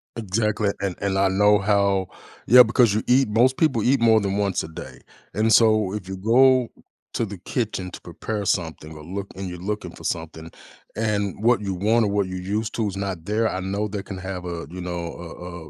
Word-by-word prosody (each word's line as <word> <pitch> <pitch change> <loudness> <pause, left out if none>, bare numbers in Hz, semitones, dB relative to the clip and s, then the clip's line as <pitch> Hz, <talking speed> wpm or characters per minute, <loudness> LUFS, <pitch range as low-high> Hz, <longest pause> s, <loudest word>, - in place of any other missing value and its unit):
Exactly, 105 0 0
and 95 -2 -2
and 100 -1 0
I 95 0 +3
know 105 +2 +4
how 100 -2 +1 0.4
yeah, 125 +2 +9
because 120 -2 +4
you 110 - 0
eat 130 0 +4
most 125 +5 +3
people 135 -8 +2
eat 130 +4 +3
more 110 -2 +4
than 100 0 -1
once 100 -2 0
a - - -7
day, 80 - -10 0.3
and 110 +2 +1
so, 110 -4 +4
if 105 -3 -6
you 95 0 -5
go 125 +5 +4 0.5
to 115 - 0
the 100 -2 -8
kitchen 100 -2 -3
to - - -9
prepare 100 +5 -5
something 80 -3 -2
or 75 - -11
look 95 +5 -6
and 95 -1 -5
you're 90 - -7
looking 105 +4 -4
for - - -13
something, 80 0 -5 0.4
and 105 -1 -2
what 120 -1 +3
you 95 -2 -3
want 110 +5 +2
or - - 0
what 100 -1 0
you 95 - -6
used 105 +4 -3
to 110 -2 0
is 100 - -5
not 95 -4 -4
there, 110 +2 +1
I 95 - -3
know 100 +3 -2
that 100 -1 -5
can 95 -2 -7
have 95 -1 -6
a 85 -1 -5
you 90 +1 -7
know, 85 -1 -4
a 85 -1 -9
100 Hz, 220 wpm, -23 LUFS, 90-110 Hz, 0.5 s, yeah